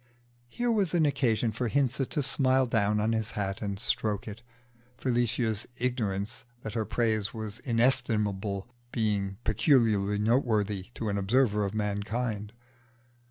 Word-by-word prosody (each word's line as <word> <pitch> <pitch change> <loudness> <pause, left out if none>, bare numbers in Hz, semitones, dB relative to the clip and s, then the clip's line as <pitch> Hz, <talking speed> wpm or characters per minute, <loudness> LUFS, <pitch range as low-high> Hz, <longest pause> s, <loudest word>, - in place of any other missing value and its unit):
Here 240 - -1
was 200 -6 +1
an 160 -3 +4
occasion 125 -5 +1
for 120 +3 -2
Hinze 135 +1 +1
to 150 - -1
smile 130 -1 +3
down 105 -3 +1
on 110 +2 +1
his 110 0 -1
hat 100 -1 -2
and 100 -2 -3
stroke 105 0 0
it 110 +1 -7 0.6
Felicia's 120 -3 0
ignorance 115 -3 -2 0.2
that 110 - -5
her 110 -2 -1
praise 110 -1 0
was 110 0 -5
inestimable 110 -5 +1 0.2
being 100 -4 -1
peculiarly 110 - +3
noteworthy 105 -4 +1
to 110 - -3
an 100 0 0
observer 105 +1 +2
of 100 +2 -4
mankind. 105 +1 -2
110 Hz, 135 wpm, -29 LUFS, 105-125 Hz, 0.6 s, an